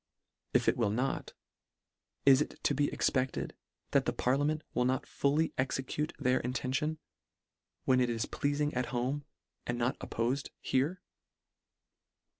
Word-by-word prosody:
If - - +4
it - - +4
will 115 -4 +2
not, 125 +6 -1 0.9
is 135 0 +7
it - - -3
to - - +3
be 145 +1 +1
expected, 130 0 0 0.4
that - - +3
the - - +2
parliament 145 +4 +1
will 125 - +2
not 130 +1 +1
fully 150 +3 +1
execute 135 +3 -1
their 130 -2 +2
intention, 130 +5 -1 0.9
when 130 -1 +4
it 125 - +2
is 115 -1 0
pleafing 145 +1 0
at 125 0 0
home, 130 +4 -1 0.4
and 120 - -1
not 120 +2 0
oppofed 125 +5 -1
here 150 +8 0
130 Hz, 135 wpm, -32 LUFS, 125-145 Hz, 0.9 s, is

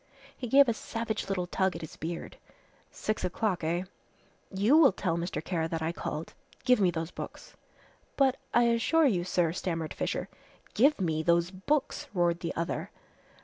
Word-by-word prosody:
He 250 - -5
gave 275 +3 +6
a 235 - +2
savage 225 -1 -4
little 185 -2 0
tug 190 +1 0
at - - -6
his 160 - -8
beard. 165 +2 -6 0.5
"Six 215 - -3
o'clock, 185 0 -1
eh? 170 +3 0 0.7
You 205 +9 +3
will 315 -6 +7
tell 180 -3 -1
Mr. 170 +2 -3
Kara 165 -3 -1
that 165 -1 -3
I 160 - 0
called. 155 -2 -5 0.3
Give 250 -2 +4
me 185 - +5
those 165 0 -3
books." - - -9 0.6
"But 270 -2 +3
I 240 - +4
assure 235 +8 +3
you, 190 -10 +2
sir, 175 -2 +1
" - - -6
stammered 165 -3 -3
Fisher. - - -2 0.5
"Give 280 +6 +4
me 160 -4 0
those 170 +2 +2
books!" 270 +10 -1
roared 175 -1 +2
the 170 - -4
other. 170 0 -2
185 Hz, 175 wpm, -29 LUFS, 170-230 Hz, 0.7 s, will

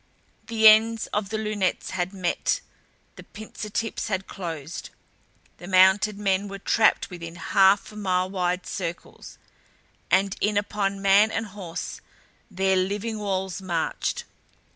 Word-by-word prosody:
The 220 -1 +5
ends 220 +1 +6
of 205 -2 -1
the 220 - -2
lunettes 210 -4 -1
had 180 0 -2
met, 185 -3 -1 0.6
the - - -10
pincer 215 0 -9
tips 225 +2 -3
had 195 -2 -2
closed. 165 -4 -6 0.7
The 175 - -11
mounted 190 +2 +4
men 200 -1 0
were 200 0 -7
trapped 215 +1 +2
within 170 -1 -8
half 195 +3 +3
mile 185 -3 0
wide 180 -1 -2
circles. 175 -2 -6 0.7
And 195 +1 +2
in 210 0 +1
upon 200 -1 -1
man 200 +2 +5
and 225 0 -2
horse 190 -5 -7 0.5
their 190 +1 +1
living 205 +4 -2
walls 190 -2 -2
marched. 175 -4 -2
195 Hz, 130 wpm, -25 LUFS, 185-210 Hz, 0.7 s, ends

